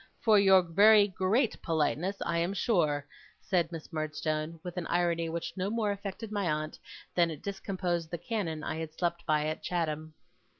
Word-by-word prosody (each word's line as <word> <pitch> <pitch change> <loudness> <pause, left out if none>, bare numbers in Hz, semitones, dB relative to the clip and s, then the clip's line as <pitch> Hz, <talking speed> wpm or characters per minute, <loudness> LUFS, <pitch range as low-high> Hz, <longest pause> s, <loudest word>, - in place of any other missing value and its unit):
For 215 -2 +5
your 190 -2 +6
very 205 +5 +6
great 205 +5 0
politeness, 165 +4 0
I 170 0 0
am 175 +4 -1
sure,' 155 -9 +1 0.3
said 175 -3 0
Miss 165 0 -8
Murdstone; 155 +1 -2
with 180 -1 -6
an 175 - -2
irony 170 -1 +1
which 170 +1 -4
no 190 +1 -1
more 215 -2 0
affected 200 +2 -6
my 200 -4 0
aunt, 155 0 -3 0.3
than 170 -1 +3
it 155 -3 -7
discomposed 185 -4 -2
the 170 - -3
cannon 170 -6 -3
I 155 - -3
had 160 -1 -5
slept 170 0 -2
by 150 -1 +2
at 155 +1 -3
Chatham. 155 -3 -2
170 Hz, 175 wpm, -30 LUFS, 160-195 Hz, 0.3 s, your